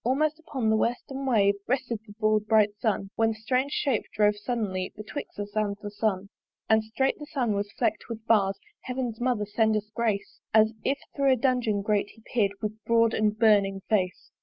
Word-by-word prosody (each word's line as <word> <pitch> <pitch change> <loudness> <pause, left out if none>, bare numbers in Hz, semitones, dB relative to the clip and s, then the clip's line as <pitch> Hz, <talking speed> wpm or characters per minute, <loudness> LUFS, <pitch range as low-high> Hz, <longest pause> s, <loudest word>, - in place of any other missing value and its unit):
Almost 300 +6 +1
upon 260 -8 -1
the - - +4
western 265 +4 -2
wave 205 -5 +4
Rested 245 -3 -1
the 205 - -11
broad 215 -1 +1
bright 215 -2 +4
Sun; 200 -3 -1
When 225 0 +3
that - - -13
strange 255 +5 0
shape 265 -7 +1
drove 210 0 +4
suddenly 205 -4 -2
Betwixt 215 +7 -7
us 205 0 -6
and 205 -2 0
the 205 -1 -7
Sun. 200 -2 -1 0.4
And 220 0 +4
strait 265 +7 0
the 295 - -8
Sun 245 -7 0
was 205 0 -2
fleck'd - - 0
with 225 -1 -6
bars 195 -4 +3 0.3
(Heaven's 250 -3 -3
mother 240 -4 +1
send 220 +1 +2
us 210 0 -6
grace) 220 -4 -2 0.2
As 220 0 +5
if 275 - +1 0.2
thro' 275 -2 +4
a - - +3
dungeon 240 -5 +1
grate 205 -1 +1
he 225 - -20
peer'd 205 -4 +2
With 215 +1 -4
broad 230 -1 +3
and 215 0 +1
burning 200 -3 +3
face. 185 -4 0
220 Hz, 195 wpm, -27 LUFS, 205-245 Hz, 0.4 s, As